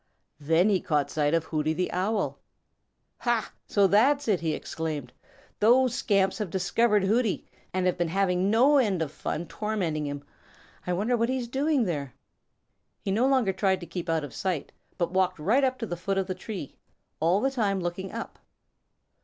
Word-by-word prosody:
Then 165 +7 +3
he 195 -3 +2
caught 150 -3 0
sight 150 +1 +1
of 165 - +1
Hooty 155 -1 -1
the 180 +3 -2
Owl. 200 +4 -1 0.8
"Ha, 240 -3 0
so 200 -1 +3
that's 265 +9 +3
it!" 200 -5 +2
he 160 -2 -1
exclaimed. 150 -6 -5 0.5
"Those 245 +3 +4
scamps 195 -5 +1
have 210 -4 -2
discovered 205 +4 +2
Hooty 220 +2 +1 0.3
and 185 0 -1
have 180 -1 +1
been 175 - +1
having 185 +1 +1
no 260 +7 +5
end 195 -9 +1
of 145 - -6
fun 160 +2 -4
tormenting 175 -6 -2
him. 145 0 -5 0.6
I 180 - +1
wonder 215 +7 +1
what 230 0 +1
he's 260 -2 -1
doing 275 +2 +1
there." 145 - -3 0.9
He 195 - 0
no 230 +6 +3
longer 255 -8 +2
tried 190 0 +1
to - - -6
keep 175 -1 -6
out 160 -2 +1
of 145 - -7
sight, 180 -6 -2 0.3
but 175 -2 -1
walked 185 -1 +1
right 215 - +2
up 260 -1 +1
to 230 - -4
the 175 - -4
foot 195 +3 -2
of 195 - +1
the 185 - -3
tree, 185 -7 -7 0.4
all 170 +5 +3
the 270 +5 +1
time 205 -7 0
looking 180 +2 -4
up. 230 - -7
190 Hz, 185 wpm, -27 LUFS, 170-225 Hz, 0.9 s, no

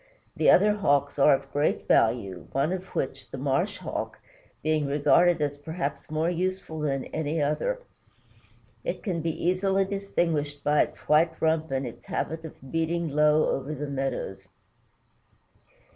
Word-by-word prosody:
The - - +3
other 210 +2 +6
Hawks 145 -8 +1
are 140 0 +7
of - - -8
great 145 +1 0
value, 100 -8 +2
one 140 +6 +1
of 185 0 -4
which, 135 0 -3
the - - -7
Marsh 145 +10 0
Hawk, 185 - -5 0.5
being 155 -1 +1
regarded 165 +4 +4
as 145 -1 -2
perhaps 150 0 -4
more 155 +1 0
useful 180 -2 -2
than 135 -3 -1
any 160 +1 -1
other. 155 - 0 1.0
It - - -4
can 180 -6 -1
be 165 0 -3
easily 190 +1 +2
distinguished 165 -7 -1
by 150 +1 +4
its - - -2
white 160 +2 +3
rump 160 0 +1
and 135 0 -1
its 120 - -9
habit 160 +2 -3
of 135 -4 -11
beating 165 0 0
low 150 +1 +4
over 140 +3 -3
the 150 +1 -4
meadows. 135 -7 -3
155 Hz, 150 wpm, -27 LUFS, 140-170 Hz, 1.0 s, are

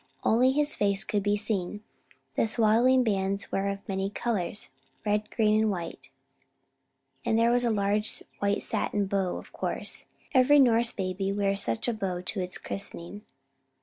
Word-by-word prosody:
Only 245 +4 +4
his 295 +2 +1
face 200 -1 +2
could 205 - -1
be 205 +1 +1
seen. 205 -1 -2 0.5
The - - +1
swaddling 235 +4 +4
bands 195 -3 -1
were 195 +1 0
of 200 0 -6
many 195 0 -2
colours, 205 -3 -2 0.3
red, 210 0 0
green, 215 -1 +2
and 220 - +2
white, 175 -4 -5 1.1
and 220 - +1
there 230 +1 +4
was 245 0 +4
a - - +2
large 210 0 0 0.2
white 200 0 0
satin 205 -1 -1
bow, 190 -2 -1
of - - -12
course. - - -2 0.3
Every 265 +2 +6
Norse 235 -3 +5
baby 195 0 -2
wears 200 0 +2
such 115 -1 -1
a 240 - +1
bow 190 -5 -3
to 185 +3 -4
its 180 0 -2
christening. 200 0 -5
205 Hz, 160 wpm, -28 LUFS, 195-225 Hz, 1.1 s, Every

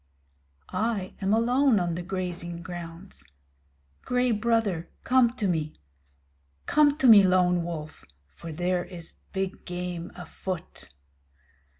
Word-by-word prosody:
I 215 -4 -2
am 195 +1 +1
alone 245 +2 +3
on 175 -1 -1
the 175 - -3
grazing 175 -2 -4
grounds. 175 +1 -8 0.8
Gray 250 0 +1
Brother 215 -6 0
come 255 -2 +4
to 215 -5 -1
me! 155 -4 -1 0.9
Come 295 -1 +4
to 270 - 0
me, 215 -4 +10
Lone 180 -2 +3
Wolf, 160 -2 -6 0.3
for 165 - -8
there 175 +2 0
is 175 -2 -8 0.2
big 195 0 -3
game 180 -1 -5
afoot! 180 0 -6
185 Hz, 115 wpm, -27 LUFS, 175-225 Hz, 0.9 s, me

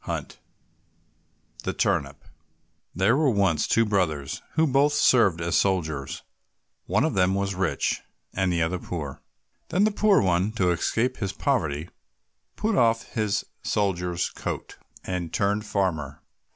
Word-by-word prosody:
146 - - -11
The - - -2
Turnip 70 0 -1 0.7
There 95 +7 +3
were 150 0 +3
once 100 -8 +2
two 115 - +3
brothers 85 -10 -1
who 160 - +3
both 140 +1 +3
served 110 - +4
as 85 0 -1
soldiers; 80 -8 0 0.6
one - - +2
of - - +1
them 95 0 +2
was 100 0 -1
rich, 95 -2 -1 0.3
and 95 -1 +1
the 85 -1 +1
other 90 +3 -1
poor. 75 -7 -6 0.5
Then 190 - +2
the 215 - +3
poor 205 -1 +4
one, 95 +3 +1
to 90 -5 +2
escape 115 +8 0
from - - -16
his 100 - -3
poverty, 80 - -1 0.7
put 220 0 0
off 115 -5 +2
his 105 -3 0 0.2
soldier's 90 -4 -1
coat, - - -6 0.2
and 90 -3 -3
turned 105 +1 0
farmer. 80 -9 -2
95 Hz, 140 wpm, -25 LUFS, 85-115 Hz, 0.7 s, served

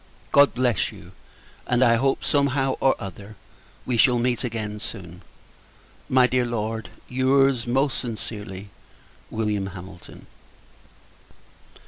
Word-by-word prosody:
God 140 0 +5
bless 120 -7 +1
you! - - -13 0.6
And 125 +1 +3
I 115 -2 +5
hope, 135 +2 0
somehow 135 -1 +1
or 135 - +3
other, 100 +2 -9 0.5
we 125 -2 0
shall 120 +3 +5
meet 120 +1 0
again 110 -3 -4
soon. 90 -3 -8 0.9
My 130 -1 +5
dear 125 0 +2
Lord, 115 -2 -3 0.2
your's, 130 -1 +2
most 135 +2 +1
sincerely, 105 -4 -6 0.6
Wm. 105 -3 -1
HAMILTON. 90 -1 -11
120 Hz, 110 wpm, -24 LUFS, 105-130 Hz, 0.9 s, God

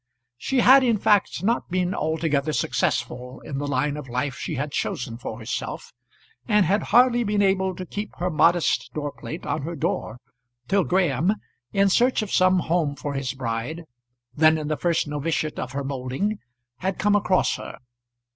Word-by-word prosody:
She 265 -2 +1
had 265 +3 +7
in 235 -4 +3
fact 205 -1 +2
not 230 +4 0
been 180 +1 0
altogether 155 -2 0
successful 125 +1 -1
in 135 -2 -5
the 145 - -3
line 145 0 0
of 145 -4 -8
life 125 +3 -1
she 145 +2 -4
had 145 +2 -3
chosen 120 -4 -3
for 110 - -6
herself, 115 0 -5 0.5
and 210 -4 +4
had 200 +6 +2
hardly 240 +1 +5
been 205 -1 +1
able 190 -1 +1
to 185 - -6
keep 205 +4 -6
her 180 +1 -1
modest 170 +2 +2
door 145 -1 -2
plate 160 +4 -8
on - - -2
her 165 +4 -5
door, 120 -5 -2 0.5
till 195 -2 +2
Graham, 180 - +2 0.4
in 200 0 +3
search 245 +4 +3
of 205 - -7
some 185 0 +4
home 160 -4 0
for 145 0 -5
his 135 -1 -3
bride, 125 +6 -4 0.5
then 155 +1 +4
in 155 -1 -4
the 155 - +1
first 170 -1 0
noviciate 150 +1 -2
of 130 - -5
her 140 0 -2
moulding, 135 +10 -2 0.4
had 185 +3 -2
come 205 +1 +2
across 190 -2 +2
her. - - -8
165 Hz, 175 wpm, -24 LUFS, 140-195 Hz, 0.5 s, had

